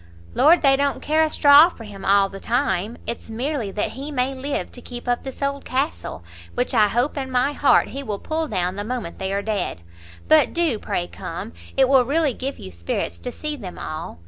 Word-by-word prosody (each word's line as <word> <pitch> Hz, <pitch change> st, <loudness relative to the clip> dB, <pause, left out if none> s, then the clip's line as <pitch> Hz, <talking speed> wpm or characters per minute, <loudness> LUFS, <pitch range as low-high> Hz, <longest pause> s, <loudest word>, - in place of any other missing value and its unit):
"Lord, 325 Hz, +3 st, +5 dB
they 270 Hz, -1 st, +6 dB
don't 280 Hz, 0 st, 0 dB
care 310 Hz, +1 st, +1 dB
a 315 Hz, -, +3 dB
straw 290 Hz, +2 st, +7 dB
for 240 Hz, -, -12 dB
him 205 Hz, -3 st, -10 dB
all 200 Hz, 0 st, +4 dB
the 195 Hz, 0 st, -9 dB
time! 230 Hz, -3 st, -1 dB
it's 235 Hz, -, -5 dB
merely 245 Hz, 0 st, -2 dB
that 210 Hz, -, -1 dB
he 280 Hz, +3 st, -7 dB
may 260 Hz, -1 st, 0 dB
live 275 Hz, +2 st, -3 dB
to 245 Hz, -, -8 dB
keep 245 Hz, 0 st, -8 dB
up 245 Hz, 0 st, +1 dB
this 265 Hz, +1 st, -7 dB
old 280 Hz, 0 st, -1 dB
castle, 265 Hz, -, -3 dB, 0.3 s
which 125 Hz, -, 0 dB
I 210 Hz, -, +5 dB
hope 245 Hz, +8 st, 0 dB
in 265 Hz, -1 st, -3 dB
my 255 Hz, +3 st, +1 dB
heart 290 Hz, -, +4 dB
he 275 Hz, -, -5 dB
will 215 Hz, -7 st, -3 dB
pull 315 Hz, +7 st, -2 dB
down 180 Hz, -5 st, -1 dB
the 205 Hz, -, -2 dB
moment 230 Hz, -5 st, -5 dB
they 190 Hz, 0 st, -2 dB
are 200 Hz, +1 st, -1 dB
dead! 210 Hz, -, -2 dB, 0.5 s
But 155 Hz, -, +5 dB
do 325 Hz, -10 st, +1 dB
pray 175 Hz, -, -2 dB
come; 175 Hz, -, -7 dB, 0.2 s
it 265 Hz, -1 st, +5 dB
will 265 Hz, -1 st, +5 dB
really 290 Hz, +2 st, +1 dB
give 270 Hz, +4 st, -4 dB
you 95 Hz, -, -9 dB
spirits 85 Hz, 0 st, -3 dB
to 85 Hz, -, -5 dB
see 300 Hz, -1 st, -4 dB
them 195 Hz, -10 st, -8 dB
all. 155 Hz, -, -6 dB
250 Hz, 220 wpm, -22 LUFS, 200-280 Hz, 0.5 s, straw